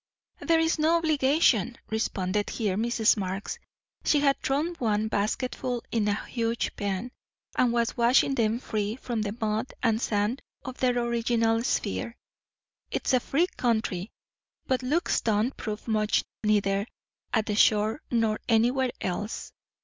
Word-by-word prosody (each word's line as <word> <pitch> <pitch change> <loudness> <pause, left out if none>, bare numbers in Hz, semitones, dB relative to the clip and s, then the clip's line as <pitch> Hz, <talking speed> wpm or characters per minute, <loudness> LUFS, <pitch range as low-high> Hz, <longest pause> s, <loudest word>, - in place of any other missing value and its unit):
"There's 325 0 +2
no 320 +2 +4
obligation," 280 - +2
responded 205 -2 -1
here 210 -5 -1
Mrs. 230 +1 +2
Marx. 190 0 -4 0.4
She 295 - +3
had 280 -1 +2
thrown 295 +6 0
one 220 -2 +1
basketful 240 +3 -1
into 215 -3 +1
a 205 - -5
huge 230 -1 -2
pan, 205 +4 -3 0.4
and 245 -2 +3
was 235 0 0
washing 245 +3 +4
them 225 -3 +1
free 215 -3 -2
from 240 -3 -3
the 210 +1 -3
mud 220 +3 -1
and 225 -1 +2
sand 210 +4 0 0.2
of 260 -1 -7
their 250 -1 +2
original 230 -1 +1
sphere. 235 -1 -2 0.7
"It's - - -1
a 255 - +5
free 295 +7 +1
country. 220 -5 0 0.6
But 260 -1 0
looks 300 +8 +1
don't 220 +4 +1
prove 215 0 -5
much 215 -1 +2 0.2
neither 200 -1 +2 0.4
at 220 -2 +1
the 210 - -1
shore 215 +4 +3
nor 225 -3 +1
anywhere 245 +3 +3
else. 205 +4 -3
230 Hz, 140 wpm, -27 LUFS, 210-255 Hz, 0.7 s, a